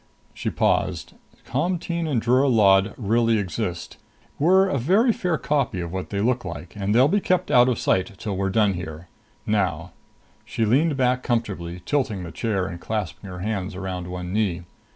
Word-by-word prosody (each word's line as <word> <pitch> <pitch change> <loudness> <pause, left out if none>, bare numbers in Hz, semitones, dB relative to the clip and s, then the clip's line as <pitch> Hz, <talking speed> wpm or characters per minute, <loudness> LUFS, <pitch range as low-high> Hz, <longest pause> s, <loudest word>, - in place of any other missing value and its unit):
She - - -3
paused. - - 0 0.3
"Comteen 170 -2 -1
and 135 -6 +1
Drura 125 +5 +3
Lod 100 -3 +4
really 115 +1 +2
exist. 95 -2 -4 0.4
We're 190 +6 +5
a 140 -8 0
very 200 - +3
fair 180 -5 -1
copy 140 -12 -1
of 85 0 -5
what 95 -1 -4
they 100 -1 -2
look 120 +2 +1
like, 80 +7 -8
and 100 +1 -1
they'll 130 +3 +6
be 205 +7 +2
kept 185 -1 0
out 125 0 +6
of 120 - 0
sight 95 +4 +1
till 100 -1 -4
we're 95 +1 -1
done 105 0 +2
here. 85 -1 -7 0.4
Now 90 -5 -1 0.3
" - - -35
She 115 - -1
leaned 140 +7 +2
back 125 -1 +2
comfortably, 95 -8 -3
tilting 130 -10 -1
the 85 - -7
chair 100 -4 -1
and 85 -2 -7
clasping 105 -2 -4
her 90 -1 -7
hands 100 -1 -3
around 90 -2 -5
one 90 0 -5
knee. 95 -5 0
105 Hz, 180 wpm, -23 LUFS, 95-130 Hz, 0.4 s, they'll